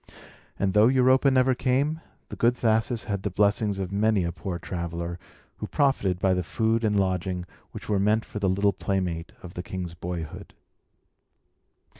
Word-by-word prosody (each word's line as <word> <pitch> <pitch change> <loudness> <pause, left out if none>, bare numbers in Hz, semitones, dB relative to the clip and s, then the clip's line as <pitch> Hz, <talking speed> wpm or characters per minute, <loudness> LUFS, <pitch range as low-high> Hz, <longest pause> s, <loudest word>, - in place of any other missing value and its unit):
And 95 -1 0
though 105 +2 +6
Europa 130 +1 +4
never 130 0 +3
came, 140 +6 0 0.3
the - - -6
good 120 +1 +2
Thasus 110 +1 +1
had 100 -2 -3
the 100 - -2
blessings 100 +1 +1
of 95 -1 -4
many 105 -1 +2
a 85 - -1
poor 85 +1 -5
traveller, 85 0 -5 0.4
who - - -5
profited 130 -11 +1
by 95 +1 +2
the 90 - 0
food 110 +7 0
and 105 -2 +2
lodging 90 -1 -1 0.2
which - - -9
were 105 -2 +1
meant 105 +3 +2
for 105 - -6
the 100 -2 +1
little 100 +2 +2
playmate 90 -3 -2
of 90 -1 -9
the 90 - -4
king's 90 -2 -5
boyhood. 85 -2 -6
100 Hz, 170 wpm, -26 LUFS, 90-110 Hz, 0.4 s, though